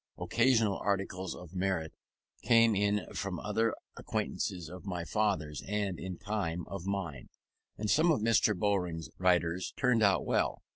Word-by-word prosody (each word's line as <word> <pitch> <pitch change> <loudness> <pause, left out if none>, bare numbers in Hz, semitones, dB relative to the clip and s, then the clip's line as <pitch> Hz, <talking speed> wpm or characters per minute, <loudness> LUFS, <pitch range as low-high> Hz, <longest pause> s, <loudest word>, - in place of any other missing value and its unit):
Occasional 115 -4 +2
articles 95 -2 -2
of 90 -1 -11
merit 90 -4 -1 0.5
came 115 -1 +5
in 105 +1 +1
from 95 -4 -3
other 110 +1 0 0.2
acquaintances 90 -3 -3
of 90 +2 -9
my 90 -4 -4
father's, 90 -8 0
and, 100 -3 -2
in 95 -2 -5
time, 95 -5 -3
of 100 -1 -7
mine; 90 -10 -3 0.5
and 105 - -2
some 155 +10 +4
of 155 - +2
Mr. 110 -2 +3
Bowring's 90 -5 -1
writers 90 -1 +1
turned 125 -3 +3
out 100 -2 +3
well. - - 0
95 Hz, 145 wpm, -31 LUFS, 90-105 Hz, 0.5 s, came